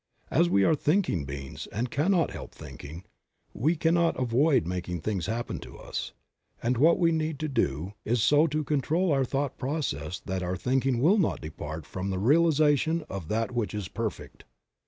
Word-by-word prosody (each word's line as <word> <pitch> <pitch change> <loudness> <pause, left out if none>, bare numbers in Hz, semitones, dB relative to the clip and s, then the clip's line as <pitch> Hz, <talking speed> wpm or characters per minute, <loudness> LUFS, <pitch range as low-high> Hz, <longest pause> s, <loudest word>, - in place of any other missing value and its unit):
As 85 - +3
we 100 +2 +4
are 160 - +4
thinking 150 - +1
beings, 70 0 -7
and 115 +4 -3
cannot 170 +3 +2
help - - -9
thinking, 80 +5 -9 0.5
we 155 +9 +1
cannot 170 0 +2
avoid 130 +2 +3
making 90 -1 -3
things 95 -3 -2
happen 115 +2 -3
to - - -11
us, - - -5 0.5
and 120 +2 +2
what 155 +7 +5
we 170 -2 +3
need 160 -2 -1
to 155 - 0
do 95 - -1
is 115 -1 +1
so 150 +2 +5
to 155 0 -1
control 155 +5 +1
our 135 -2 +3
thought 135 +2 -2
processes 125 - -3
that 95 0 -2
our 90 +1 -2
thinking 130 0 +1
will 195 +8 +5
not 175 - +1
depart 80 0 -7
from 95 +5 -4
the 95 - -1
realization 155 - +3
of 95 -5 -5
that 115 +4 -1
which 110 -5 -2
is 105 -3 -3
perfect. 115 -2 -5
125 Hz, 180 wpm, -28 LUFS, 95-155 Hz, 0.5 s, what